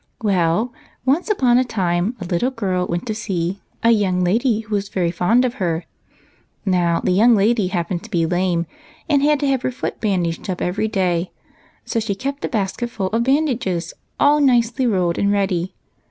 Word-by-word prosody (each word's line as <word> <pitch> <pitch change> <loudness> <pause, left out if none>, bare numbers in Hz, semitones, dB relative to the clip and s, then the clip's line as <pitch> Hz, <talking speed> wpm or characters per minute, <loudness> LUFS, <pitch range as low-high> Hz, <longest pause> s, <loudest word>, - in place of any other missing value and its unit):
" - - -44
Well, 195 +3 +1 0.3
once 295 +10 +1
apon 255 - +3
a - - +3
time, 190 -2 -1
a 185 - -5
little 175 +8 0
girl 190 -8 -2
went 175 +1 -3
to 220 - -2
see 195 -4 -3 0.2
a 230 - +5
young 190 -5 +2
lady 225 +5 +1
who 220 -1 -8
was 200 -1 -1
very 175 -3 0
fond 220 +9 +2
of 245 - -1
her. 165 -2 -1 0.8
Now, 175 -3 +2
the - - 0
young 225 +6 +5
lady 210 0 +2
happened 175 -1 -2
to - - -11
be 170 -6 +1
lame, 175 0 0 0.4
and 285 -3 +3
had 295 0 +3
to 285 - +1
have 270 -2 +1
her - - -1
foot 255 - -5
bandaged 180 -5 -1
up 180 - -2
every 195 +5 -1
day; 180 -4 0 0.6
so 235 -1 -1
she 215 -3 -2
kept 275 +6 -4
a - - -1
basketful 215 -1 -2
of 225 +1 +1
bandages, 250 - 0 0.3
all 295 +1 +5
nicely 245 -1 +3
rolled 180 -6 +1
and 200 0 +2
ready. 190 -3 0
200 Hz, 190 wpm, -20 LUFS, 180-240 Hz, 0.8 s, a